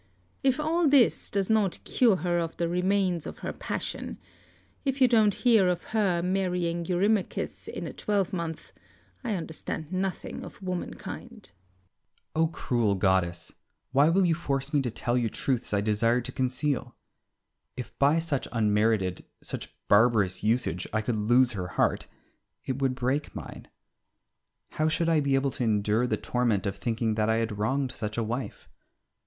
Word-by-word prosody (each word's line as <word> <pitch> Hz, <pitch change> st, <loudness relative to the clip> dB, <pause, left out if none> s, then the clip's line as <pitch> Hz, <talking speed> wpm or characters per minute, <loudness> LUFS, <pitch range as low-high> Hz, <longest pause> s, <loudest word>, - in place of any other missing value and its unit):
If 265 Hz, 0 st, +2 dB
all 320 Hz, +2 st, +2 dB
this 275 Hz, -4 st, +4 dB
does 195 Hz, -2 st, 0 dB
not 215 Hz, -4 st, +2 dB
cure 235 Hz, -6 st, +3 dB
her 175 Hz, -1 st, 0 dB
of 165 Hz, -1 st, -3 dB
the 170 Hz, -, 0 dB
remains 180 Hz, -1 st, +1 dB
of -, -, -7 dB
her -, -, -3 dB
passion, -, -, -4 dB, 0.7 s
if 270 Hz, -1 st, -1 dB
you 260 Hz, -, +7 dB
don't 220 Hz, -4 st, +4 dB
hear 225 Hz, -6 st, +4 dB
of 180 Hz, -1 st, 0 dB
her 190 Hz, -6 st, +2 dB
marrying 180 Hz, -2 st, -1 dB
Eurymachus 195 Hz, +2 st, 0 dB
in -, -, -5 dB
a -, -, -6 dB
twelvemonth, 185 Hz, -6 st, -2 dB, 0.5 s
I 225 Hz, -4 st, -1 dB
understand 160 Hz, -1 st, -5 dB
nothing 190 Hz, 0 st, -3 dB
of -, -, -10 dB
womankind. 185 Hz, -2 st, -6 dB
Ulysses. 90 Hz, 0 st, -41 dB
O 160 Hz, +1 st, +3 dB
cruel 120 Hz, -9 st, 0 dB
goddess! 90 Hz, -3 st, 0 dB, 0.4 s
why 140 Hz, +4 st, +5 dB
will 185 Hz, +3 st, +3 dB
you 170 Hz, -, +3 dB
force 140 Hz, -3 st, -2 dB
me 145 Hz, -, +4 dB
to 125 Hz, -, -1 dB
tell 120 Hz, +1 st, -2 dB
you 120 Hz, -2 st, +1 dB
truths 125 Hz, +2 st, -1 dB
I 100 Hz, -1 st, +2 dB
desire 115 Hz, +3 st, +2 dB
to 130 Hz, -, -6 dB
conceal? 130 Hz, -1 st, -1 dB, 0.8 s
If 125 Hz, -, -7 dB
by 145 Hz, +3 st, +4 dB
such 160 Hz, -5 st, -1 dB
unmerited, 105 Hz, -4 st, +1 dB, 0.2 s
such -, -, -5 dB, 0.2 s
barbarous 105 Hz, -4 st, +3 dB
usage 110 Hz, -5 st, 0 dB
I 110 Hz, 0 st, 0 dB
could 115 Hz, +1 st, -1 dB
lose 120 Hz, +4 st, +4 dB
her 95 Hz, -5 st, -4 dB
heart -, -, +1 dB, 0.6 s
it 130 Hz, +1 st, -3 dB
would 130 Hz, -1 st, +1 dB
break 130 Hz, +4 st, -1 dB
mine. -, -, -8 dB, 1.0 s
How 155 Hz, -, 0 dB
should 165 Hz, +1 st, +1 dB
I 160 Hz, -2 st, +4 dB
be 140 Hz, -2 st, +2 dB
able 135 Hz, 0 st, +1 dB
to 130 Hz, -, -2 dB
endure 110 Hz, +2 st, +2 dB
the -, -, 0 dB
torment 120 Hz, -6 st, 0 dB
of 100 Hz, -, -2 dB
thinking 115 Hz, -2 st, -1 dB
that 110 Hz, 0 st, +1 dB
I 110 Hz, -, +3 dB
had 115 Hz, -2 st, -2 dB
wronged 130 Hz, +4 st, 0 dB
such 110 Hz, -3 st, -5 dB
a 115 Hz, -, +1 dB
wife? 120 Hz, +4 st, -5 dB
135 Hz, 165 wpm, -28 LUFS, 110-180 Hz, 1.0 s, you